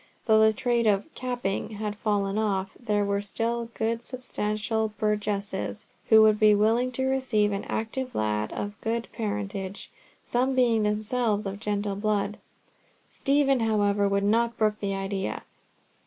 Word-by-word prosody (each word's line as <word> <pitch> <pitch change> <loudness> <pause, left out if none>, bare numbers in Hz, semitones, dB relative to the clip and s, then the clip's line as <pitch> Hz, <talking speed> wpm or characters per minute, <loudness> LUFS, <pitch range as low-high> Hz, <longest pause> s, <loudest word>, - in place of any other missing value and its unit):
Though 220 -2 +5
the 220 0 +6
trade 235 +1 0
of 210 +9 +1
"capping" 245 -7 -3
had 210 0 -3
fallen 205 -1 0
off, 195 -3 0
there 210 -4 0
were 200 0 0
still 230 +3 -2
good 230 +1 -1
substantial 220 -3 -2
burgesses 200 - -2 0.2
who 220 -1 +8
would 215 -1 +4
be 215 -1 +6
willing 225 +5 +2
to 260 +2 -1
receive 255 -6 +1
an 200 0 -3
active 250 +3 -3
lad 105 0 -1
of 205 +1 -5
good 230 +1 -2
parentage, 200 -3 -4 0.3
some 255 +2 0
being 235 -3 +3
themselves 215 +1 +1
of 195 +1 -4
gentle 205 -1 -2
blood. 210 0 -1 0.7
Stephen, 275 -1 +2
however, 205 -2 +2
would 200 0 +1
not 230 +3 +2
brook 215 -1 +1
the 195 -1 -2
idea. 195 0 -3
215 Hz, 145 wpm, -27 LUFS, 200-230 Hz, 0.7 s, who